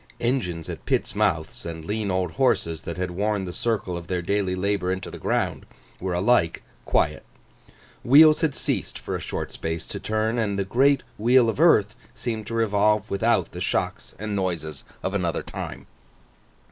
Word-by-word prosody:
Engines 100 - -1
at - - -7
pits' - - 0
mouths, - - 0
and 80 -1 -6
lean 105 +2 -2
old 95 -2 0
horses 85 -11 +1
that 85 - -5
had 90 0 -2
worn 100 +1 -1
the 90 - -6
circle 110 -6 -1
of 85 -1 -7
their 90 -1 -2
daily 95 0 0
labour 95 -1 0
into 95 +1 -4
the - - -8
ground, - - -1 0.4
were 90 -1 -2
alike 90 -3 +2 0.2
quiet; - - +1 0.8
wheels 155 +4 +7
had 155 -4 +1
ceased - - -2
for - - -4
a - - -2
short - - -4
space 80 0 -4
to - - -6
turn; 110 +2 0
and 100 -3 0
the 100 - 0
great 135 +7 +3 0.2
wheel 120 +1 +5
of 115 - -3
earth 110 -11 +5 0.2
seemed 110 -4 -4
to 115 - -4
revolve 105 -1 +2
without 100 -3 +2
the 90 - -7
shocks 90 -1 -2
and 105 0 -3
noises 85 -7 -3 0.2
of 95 - -2
another 90 -4 -1
time. - - -7
100 Hz, 175 wpm, -25 LUFS, 90-115 Hz, 0.8 s, wheels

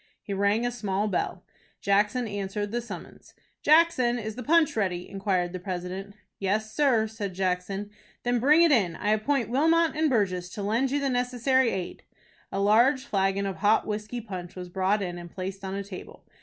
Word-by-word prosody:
He 200 - -4
rang 200 +4 +2
a 245 - 0
small 210 -3 -1
bell. 190 - -2 0.4
Jackson 210 +5 +1
answered 205 0 -3
the 240 +1 -1
summons. 235 - -10 0.3
"Jackson, 300 -6 +4
is 220 -2 -4
the 250 - -6
punch 310 +2 +3
ready?" 185 -5 -1
inquired 190 -3 -1
the 185 - -4
president. 185 +2 -5 0.2
"Yes, 215 +3 -1
sir," 255 -6 +3
said 210 -4 -5
Jackson. 190 +2 -2 0.3
"Then 245 0 +1
bring 300 +7 +5
it 335 - +5
in. 195 - +3
I 205 +5 -1
appoint 235 +3 +1
Wilmot 325 +5 +3
and 310 0 +2
Burgess 185 -7 0
to 205 - -5
lend 230 +6 +1
you 285 +2 0
the 275 -2 0
necessary 250 +1 +2
aid." 185 -4 -4 0.5
A 195 - -2
large 240 +7 +4
flagon 195 -3 0
of 195 -1 -3
hot 210 +2 +3
whiskey 215 +3 -4
punch 185 -5 -7
was 180 -1 -7
brought 190 +3 +1
in 175 -1 -4
and 175 0 -9
placed 190 +2 -6
on 190 0 -4
a 200 - -3
table. 190 -2 -10
210 Hz, 185 wpm, -27 LUFS, 190-245 Hz, 0.5 s, bring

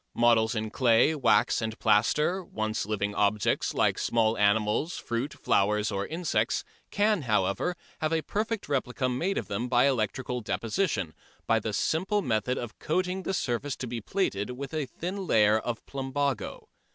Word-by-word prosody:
Models 115 -1 +3
in 110 -1 -2
clay, 120 +4 +4
wax 130 -6 +3
and 110 0 -3
plaster, 150 - +2
once 110 - -3
living 105 -1 -1
objects 105 +1 +1
like - - +2
small 115 -1 +2
animals, 105 - +1
fruit, 120 +4 -3
flowers 105 +2 +1
or 100 0 -2
insects, 165 0 0 0.3
can, 210 -2 +2
however, 110 - 0 0.2
have 155 0 0
a 160 -1 +1
perfect 215 +1 -2
replica 130 -2 -1
made 165 +11 -1
of - - -3
them 115 +5 -3
by 125 +1 +4
electrical 125 0 -1
deposition, 115 - -1 0.3
by 115 - +3
the 110 0 -3
simple 190 - 0
method 120 -1 0
of 120 -2 -6
coating 185 +3 -1
the 190 - -3
surface 135 -1 -2
to - - -5
be 120 -1 -4
plated 105 - -1
with 140 +3 -6
a 155 -4 -1
thin 185 +6 -5
layer 105 -3 +4
of 120 0 -5
plumbago. 135 -2 -3
120 Hz, 160 wpm, -28 LUFS, 110-155 Hz, 0.3 s, clay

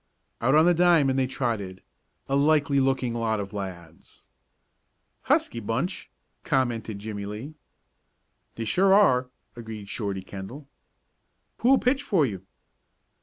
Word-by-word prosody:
Out 130 +5 +3
on 155 +1 +6
the 175 - +5
diamond 160 -6 +3
they 130 - +1
trotted 110 -8 -3 0.4
a 135 - 0
likely 145 -1 +3
looking 130 -2 +1
lot 115 -2 -1
of 100 0 -6
lads. 85 -5 -9 1.0
"Husky 115 - +1
bunch," 120 - -3 0.3
commented 120 -7 -1
Jimmie 100 -1 -6
Lee. 110 +9 -7 1.0
"They 115 - -4
sure 190 - +4
are," 130 -11 +4 0.3
agreed 110 -4 -8
Shorty 100 -4 -3
Kendall. 100 +10 -9 0.9
"Who'll 265 +3 +5
pitch 260 +2 +1
for 190 - +2
you?" 95 -7 -5
120 Hz, 125 wpm, -26 LUFS, 105-145 Hz, 1.0 s, on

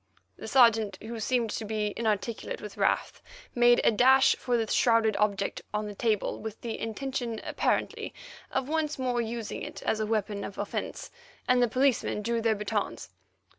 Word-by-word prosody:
The - - -9
Sergeant, 230 -5 +4
who 225 +1 -7
seemed 235 0 0
to - - -3
be 210 -1 -2
inarticulate 220 0 -2
with 210 -1 -8
wrath, - - 0 0.3
made 240 0 +5
a - - +5
dash 260 +4 +5
for 245 -1 0
the 225 - 0
shrouded 225 -1 +3
object 200 -2 0
on 210 0 -1
the 210 - -6
table, 215 0 0
with 220 0 -6
the 230 -2 -4
intention, 235 0 -3
apparently, - - -1 0.4
of 265 -1 -2
once 310 0 -1
more 250 -2 0
using 230 -1 -4
it - - -7
as 220 - 0
a 215 - -1
weapon 210 -2 -1
of 200 - -7
offence, 205 - -4 0.4
and 250 0 +4
the 245 - +4
policemen 255 -3 +1
drew 235 +1 0
their 225 -1 +2
batons. 205 - -3
225 Hz, 170 wpm, -28 LUFS, 210-245 Hz, 0.4 s, made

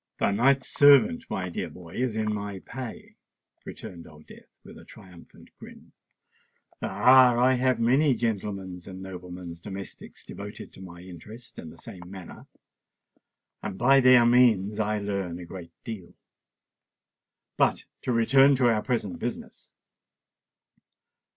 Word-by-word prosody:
"The - - +1
knight's 130 +6 +2
servant, 180 - +5
my 90 -1 -3
dear 85 - -4
boy, 85 -2 -13
is 125 -3 -2
in 110 -1 -1
my 100 -1 -5
pay," 125 +4 -9 0.5
returned 85 -2 -10
Old 75 -1 -16
Death, - - -16
with - - -13
a - - -14
triumphant 90 -3 -16
grin. - - -14 0.9
"Ah! 125 -2 +5
I 125 +2 +4
have 130 -1 +1
many 130 +4 +3
gentlemen's 100 -6 -4
and 95 -1 -9
noblemen's 90 -2 -9
domestics 95 0 -9
devoted 105 +1 -9
to - - -13
my 85 -2 -11
interests 95 +7 -12
in 80 - -9
the - - -14
same 90 -1 -11
manner; 95 -2 -11 1.1
and 95 -3 -6
by 135 +4 +5
their 125 -2 +6
means 110 -4 +3
I 105 0 0
learn 100 -4 -3
a 90 - -9
great 85 -1 -10
deal. 105 -7 -8 1.4
But - - +1 0.2
to - - -2
return 135 +4 +5
to 125 -2 +3
our 105 - -1
present 110 -7 -3
business. - - -7
105 Hz, 140 wpm, -26 LUFS, 90-125 Hz, 1.4 s, their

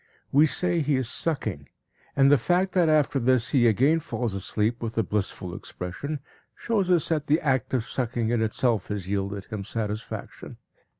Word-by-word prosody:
We 150 +3 +6
say 175 +3 0
he 145 -2 +1
is 130 -3 0
sucking, 110 - -2 0.5
and 135 0 +5
the 145 - +6
fact 185 +2 +1
that 175 -3 +3
after 150 -3 +3
this 125 -1 +2
he 125 -3 +4
again 135 +9 +3
falls 120 -8 -3
asleep 105 +4 -1
with 115 0 -4
a 115 - +3
blissful 95 -3 -3
expression 115 - -6 0.3
shows 205 -6 -1
us 175 -3 +3
that 155 -2 0
the 155 +3 +3
act 130 -6 0
of 120 -3 0
sucking 120 -3 -2
in 120 -2 +1
itself 110 -1 0
has 100 -3 -4
yielded 100 0 -2
him 105 -4 -5
satisfaction. 110 +1 -5
125 Hz, 175 wpm, -26 LUFS, 105-150 Hz, 0.5 s, We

